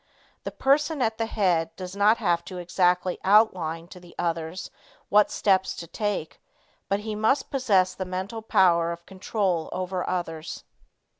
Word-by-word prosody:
The - - -3
person 295 +3 +1
at 220 -1 -1
the 225 - 0
head 170 -7 0
does 185 0 -7
not 210 +3 +4
have 175 -5 +1
to 185 - -7
exactly 180 0 +1
outline 180 -6 +3
to 180 - -11
the 175 -1 -16
others 165 +1 -3 0.4
what 210 0 +5
steps 190 -2 +1
to 170 - -7
take, 205 -2 -4 0.5
but 200 +1 0
he 215 0 -4
must 220 +6 +1
possess 200 -9 +2
the 190 - -4
mental 190 +5 -5
power 170 -5 +3
of 170 0 -8
control 190 -3 -2
over 185 0 -3
others. 165 -3 -4
185 Hz, 155 wpm, -26 LUFS, 175-210 Hz, 0.5 s, what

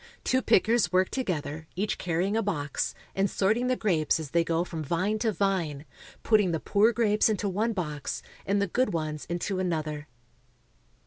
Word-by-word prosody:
Two 260 0 +2
pickers 225 +1 +3
work 185 0 +3
to 260 - -1
gether, 160 -4 -4
each 200 +3 -1
carrying 180 +4 0
a 225 - +2
box, 150 -9 -2 0.2
and 195 +1 +1
sorting 220 +6 +1
the 255 - +2
grapes 165 - +1
as 150 -4 -6
they 170 0 +3
go 165 0 0
from 165 -3 -5
vine 185 +8 0
to 225 0 +1
vine, 180 -8 -1 0.4
putting 210 -4 +4
the 160 - -1
poor 210 +7 +3
grapes 215 -2 +3
into 210 -1 0
one 210 +5 0
box 150 -7 -4 0.2
and 200 +1 +1
the 200 - +2
good 250 +6 0
ones 155 -2 -3
into 175 +3 -2
another. 155 -4 -2
185 Hz, 180 wpm, -28 LUFS, 160-210 Hz, 0.4 s, putting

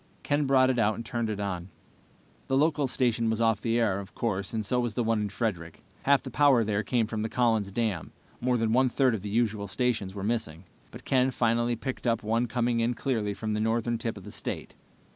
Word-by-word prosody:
Ken 145 0 +1
brought 130 -1 +5
it 125 - -1
out 110 -1 +2
and 115 - -7
turned 115 -1 -2
it 105 -2 -3
on. 95 -3 -3 0.8
The 135 - +1
local 150 -1 +2
station 120 -3 +1
was 110 0 0
off 115 -2 +2
the 115 +1 +1
air, 105 -4 +1
of 100 -1 -10
course, 100 -4 -2
and 110 -2 -2
so 125 +5 +1
was 120 -3 -2
the 120 - +1
one 115 -1 +1
in 105 - -2
Frederick. 95 -6 -4 0.2
Half 140 0 +3
the - - -7
power 140 -5 +4
there 105 -1 0
came 115 0 +1
from 110 0 -4
the 110 - -2
Collin's 110 -5 +1
Dam. 105 -5 -2 0.3
More 125 0 +1
than 115 -1 +1
one 130 +1 +4
third 130 0 +2
of 110 - -3
the 105 - -5
usual 105 -2 0
stations 105 -3 -1
were 100 - -5
missing, 105 -7 -2 0.3
but - - -12
Ken 130 0 +3
finally 120 -1 +1
picked 130 +2 -5
up 115 -2 +1
one 115 +3 +1
coming 120 0 0
in 120 +1 +1
clearly 110 -7 -1
from 110 0 -3
the 105 - -1
northern 115 +1 0
tip 115 -2 -3
of 100 - -10
the - - -9
state. - - -5
115 Hz, 235 wpm, -28 LUFS, 105-125 Hz, 0.8 s, brought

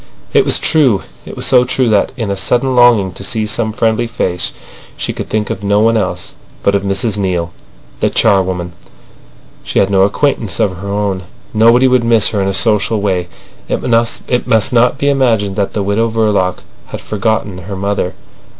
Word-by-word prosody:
It - - +4
was - - +3
true. 130 -11 +2 0.2
It - - -8
was - - -2
so 125 -1 +5
true 125 0 0
that, 105 -2 +2
in 110 -5 -2
a - - -1
sudden 125 +6 0
longing 120 -6 +4
to 95 - -10
see 110 +2 -2
some 110 +1 -1
friendly 115 +2 0
face, 90 -6 -3 0.5
she - - -3
could - - -6
think 105 -1 -1
of 95 - -5
no 100 +1 +2
one 115 +1 +3
else 110 - -3 0.3
but 100 - +2
of 100 - +1
Mrs 100 +2 -1
Neale, 90 -3 -1 0.5
the - - +1
charwoman. 95 -4 +1 0.9
She - - -4
had 100 - +2
no 95 -1 +3
acquaintances 110 +1 0
of 95 -3 0
her 100 +3 -8
own. 100 -2 -2 0.3
Nobody 115 +4 +4
would 125 -1 +2
miss 115 -2 +3
her 105 - -1
in 95 - 0
a - - 0
social 110 0 +2
way. 95 -3 -1 0.4
It - - -2 0.6
must 110 +1 +2
not 125 +2 +3
be 140 - -1
imagined 115 -8 +1
that 100 -2 -1
the 105 - -1
Widow 105 +4 0
Verloc 105 -5 0 0.2
had - - -7
forgotten 105 -2 -2
her 95 +3 -7
mother. 100 -1 -2
105 Hz, 185 wpm, -14 LUFS, 95-115 Hz, 0.9 s, so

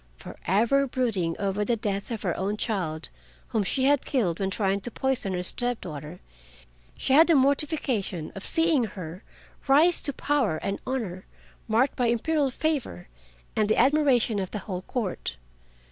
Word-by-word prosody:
Forever 235 - +1
brooding 220 -11 -1
over 200 +1 -1
the 235 +3 +1
death 200 -2 -3
of 225 -3 -4
her 175 -4 0
own 200 +3 -2
child 180 -9 -2 0.4
whom 220 -3 +1
she 260 +7 0
had 285 0 +3
killed 195 - 0
when 195 -1 0
trying 195 0 0
to 240 - -6
poison 260 -6 -1
her 180 0 -2
step 245 +5 0
daughter, 155 +1 -8 0.8
she 265 - 0
had 320 +4 +7
the 335 - +5
mortification 270 - +1
of 195 - -7
seeing 325 -1 +2
her 180 -3 -8 0.5
rise 310 +6 +5
to 285 - -1
power 275 - 0
and 195 +5 -3
honor, 215 -9 -3 0.4
marked 235 +5 +2
by 245 -2 +1
Imperial 280 +5 +1
favor 260 - -2 0.5
and 215 -1 +1
the - - +3
admiration 260 -5 +3
of 190 -2 -3
the - - -4
whole 185 -4 -4
Court. 185 - -4
220 Hz, 160 wpm, -26 LUFS, 190-270 Hz, 0.8 s, had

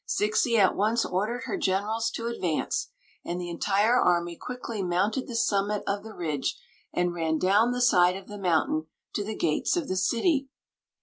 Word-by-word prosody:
Zixi 215 +3 +2
at 195 -3 +4
once 220 +3 +1
ordered 215 +7 -2
her 235 - -3
generab 210 +4 0
to 230 - -4
advance, 185 -9 -1 0.4
and 175 +1 -3
the 175 -1 -5
entire 205 +7 +2
army 175 -1 +2
quickly 235 -2 -5
mounted 195 +7 0
the 240 - -6
summit 205 -2 +1
of 200 0 -2
the 220 -1 -10
ridge 155 -5 -2 0.3
and 175 0 0
ran 160 -2 0
down 205 +8 +3
the 245 0 -2
side 180 -6 +5
of 195 0 -9
the 205 -1 -8
mountain 160 -3 +1 0.3
to 205 - -1
the 215 +1 -4
gates 160 - +1
of 335 - -2
the 185 - -2
city. 270 - +1
200 Hz, 180 wpm, -27 LUFS, 175-230 Hz, 0.4 s, side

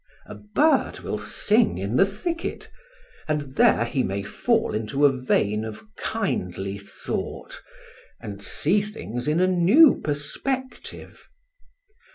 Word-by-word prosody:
A - - -9
bird 285 +10 +1
will - - -3
sing 215 +2 +2
in 100 +5 -3
the 195 - +5
thicket. 335 - -4 0.6
And 145 -3 -3
there 115 - +4
he 125 +3 -1
may 100 -3 -2
fall 225 - 0
into 115 +7 +1
a 140 - +6
vein 110 -4 0
of 110 -1 -7
kindly 100 - -3
thought, 100 - -6 0.6
and 100 -2 -8
see 180 - +1
things 135 - -6
in 155 +3 +2
a 185 - +4
new 185 - +5
perspective. 255 - -4
150 Hz, 125 wpm, -24 LUFS, -, 0.6 s, a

